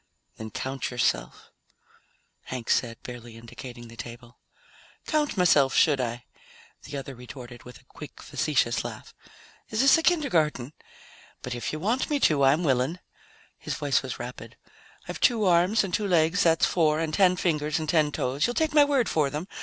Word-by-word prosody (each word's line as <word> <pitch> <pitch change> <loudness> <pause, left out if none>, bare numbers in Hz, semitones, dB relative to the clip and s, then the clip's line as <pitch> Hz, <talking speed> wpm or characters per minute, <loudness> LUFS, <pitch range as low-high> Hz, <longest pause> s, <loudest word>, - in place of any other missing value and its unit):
"Then 110 0 -7
count 130 +5 -4
yourself," 125 -1 -2 0.9
Hank 125 -3 -4
said, 115 -2 0
barely 120 -2 -9
indicating 120 +1 -10
the 115 - -13
table. 120 +1 -10 0.7
"Count 300 -6 0
myself, 145 -7 +4
should 145 -4 +4
I?" 120 -1 -4 0.6
the 145 - -6
other 135 0 -7
retorted 125 -1 -11
with 125 -2 -12
a - - -24
quick - - -12
facetious - - 0
laugh. - - -8 0.6
"Is 220 - 0
this 275 +4 +6
a - - -1
kindergarten? 160 - +1 0.7
But 125 - -4
if 120 - -4
you 155 - -5
want 225 +10 0
me 295 -1 +1
to, 145 -3 +3
I'm 140 +6 +4
willing." 135 +3 +1 0.6
His - - -4
voice - - +1
was - - -6
rapid. - - -9 0.5
"I've - - -6
two 230 -4 +3
arms, 185 +5 +3
and 190 -2 -5
two 210 - 0
legs, 170 0 +2
that's 165 -1 +4
four. 155 -3 +2
And 160 -1 -2
ten 185 0 +4
fingers 155 -4 0
and 155 - -3
ten 155 -1 +2
toes 140 +2 -1
you'll 240 - -3
take 315 -1 0
my 295 -1 +7
word 280 -4 +1
for 150 -3 +1
them? 150 +6 -5
150 Hz, 175 wpm, -26 LUFS, 125-185 Hz, 0.9 s, my